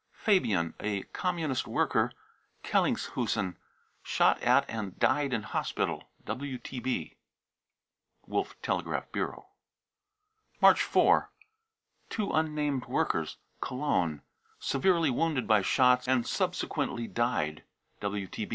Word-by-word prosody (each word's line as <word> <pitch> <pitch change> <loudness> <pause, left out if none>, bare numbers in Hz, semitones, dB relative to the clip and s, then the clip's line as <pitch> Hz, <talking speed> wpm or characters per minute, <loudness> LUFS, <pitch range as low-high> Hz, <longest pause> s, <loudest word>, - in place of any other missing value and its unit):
fabian, 105 - +2
a 105 -2 -2
Communist 165 -7 -1
worker, - - +1 0.5
Kellinghusen, 105 -6 0 0.5
shot - - +2
at - - +4
and 105 -4 -5
died 140 +1 +2
in 115 -4 -1
hospital. - - -2 0.2
(WTB.) 130 -2 -4 1.1
March - - -1
4th. 420 +1 0 0.8
two 210 -3 -2
unnamed 150 -4 0
workers, - - 0 0.2
Cologne, 90 - -1 0.3
severely 165 +1 +2
wounded 145 0 0
by 110 -2 +5
shots 125 +4 +4
and 130 -2 +2
subsequently 120 -1 -1
died. 115 -12 -1
130 Hz, 80 wpm, -30 LUFS, 110-155 Hz, 1.1 s, by